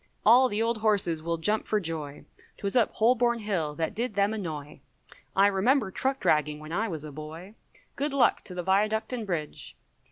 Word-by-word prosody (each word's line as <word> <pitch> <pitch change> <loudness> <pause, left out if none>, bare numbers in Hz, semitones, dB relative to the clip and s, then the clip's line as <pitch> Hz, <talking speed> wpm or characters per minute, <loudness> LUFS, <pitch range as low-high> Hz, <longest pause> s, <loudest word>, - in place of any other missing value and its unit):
All 250 +4 +7
the 215 +1 0
old 230 -1 0
horses 200 -7 +1
will 170 +1 -2
jump 210 +7 0
for 215 - +1
joy, 155 -5 -5 0.3
'Twas 200 +2 -3
up 235 -4 +3
Holborn 235 +1 +3
Hill 185 -9 -2
that 160 +3 -2
did 230 0 -3
them 200 +1 +2
annoy, 155 -8 -6 0.6
I 195 - +5
remember 205 +3 +2
truck 265 +6 -1
dragging 150 -1 +1
when 155 +1 -10
I 215 +6 0
was 160 -7 -5
a 155 - -8
boy, 155 +6 -9 0.4
Good 290 +1 -2
luck 275 -2 +3
to 180 - -8
the 180 - -3
Viaduct 215 +6 +1
and 230 -4 -4
Bridge. 160 -5 -4
200 Hz, 190 wpm, -27 LUFS, 160-225 Hz, 0.6 s, All